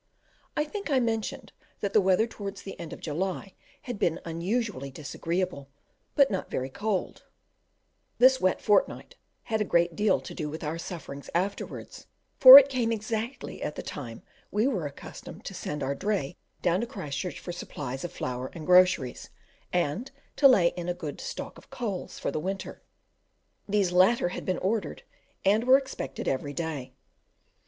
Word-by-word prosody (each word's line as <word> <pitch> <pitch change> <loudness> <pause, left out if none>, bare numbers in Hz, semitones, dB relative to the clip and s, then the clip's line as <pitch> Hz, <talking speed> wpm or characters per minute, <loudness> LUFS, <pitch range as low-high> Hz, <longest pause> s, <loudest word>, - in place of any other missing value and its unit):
I 300 - +3
think 395 +4 -6
I 270 -3 +3
mentioned 225 -3 -2 0.3
that 200 -1 -2
the 215 - +6
weather 190 +3 +3
towards 200 -3 -7
the 195 - -8
end 165 - -7
of - - -8
July 185 +5 -3 0.3
had 245 -5 -5
been 165 - +1
unusually 170 - -2
disagreeable, 160 +1 -3 0.5
but 280 -4 +5
not 190 - -3
very 130 +1 -3
cold 205 +4 -3 0.9
This 260 +1 +6
wet 185 - +2
fortnight 210 - +1 0.3
had 220 -2 -1
a - - +4
great 170 -3 +2
deal 210 +3 +3
to - - -9
do 155 -3 -4
with 160 +2 -7
our 160 +2 -3
sufferings 140 -5 -7
afterwards, 190 +4 -3 0.3
for 260 0 +14
it 280 -1 +9
came 250 -4 0
exactly 225 +3 -4
at 150 - -3
the - - -6
time 115 -6 -7 0.3
we 210 +3 +1
were 190 - -1
accustomed 140 - -10
to - - -5
send 150 -1 -4
our 135 +1 0
dray 180 -1 -2 0.3
down 175 +1 +2
to 235 - -2
Christchurch 170 - -5
for 175 - -6
supplies 135 -6 -6
of 175 - -4
flour 125 0 -4
and 160 -2 -8
groceries, 180 -8 +4 0.4
and 180 - -1 0.3
to 280 - +7
lay 190 -10 +5
in 175 0 -5
a 175 - -1
good 160 -5 -6
stock - - -6
of - - -21
coals 210 -7 -4
for - - -2
the 155 - -2
winter; 195 +4 -5 0.9
these 200 -3 +2
latter 185 +2 +4
had - - -6
been 185 -2 0
ordered, 210 +3 -2 0.4
and 210 +4 +3
were 260 +1 +8
expected 270 -1 -5
every 145 +2 -1
day. 145 -6 -4
185 Hz, 170 wpm, -28 LUFS, 160-220 Hz, 0.9 s, for